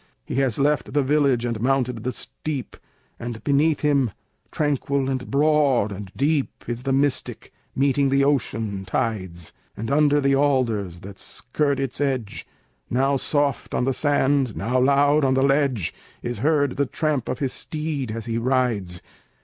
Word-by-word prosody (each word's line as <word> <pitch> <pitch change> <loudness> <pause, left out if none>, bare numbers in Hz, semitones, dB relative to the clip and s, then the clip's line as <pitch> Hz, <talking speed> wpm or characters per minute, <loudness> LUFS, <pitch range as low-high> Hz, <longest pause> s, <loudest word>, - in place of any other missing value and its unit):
He - - -6
has 130 -5 +1
left 145 +1 +1
the 145 - +3
village 135 -4 +2
and 115 -3 -2
mounted 125 -3 0
the 130 - -1
steep, 140 0 -5 0.4
And 120 -1 -6
beneath 145 +2 +2
him, 140 -4 +2 0.4
tranquil 140 -2 0
and 130 -1 -3
broad 140 -6 +3
and 100 -1 -7
deep, 145 0 -1
Is 120 0 -3
the 135 +1 -2
Mystic, 140 0 -1 0.2
meeting 140 0 +2
the 135 0 +3
ocean 115 -8 0
tides; 95 -5 -3 0.2
And 115 +3 -4
under 145 0 +4
the 140 -1 +2
alders, 115 -11 0
that 100 0 -10
skirt 140 +3 -2
its 135 0 -3
edge, 130 -7 -2 0.4
Now 135 +3 +2
soft 145 0 0
on - - +1
the 135 +1 +1
sand, 140 -4 +1
now 125 +2 0
loud 140 +3 +4
on 130 -1 +3
the 135 - +3
ledge, 135 - +1 0.3
Is 120 -3 -3
heard 145 0 +1
the 140 -1 +1
tramp 150 -2 -1
of 130 - -2
the 140 - 0
steed 150 -2 -4
as 115 0 -5
he 115 0 -1
rides. 115 -8 0
135 Hz, 160 wpm, -23 LUFS, 120-145 Hz, 0.4 s, under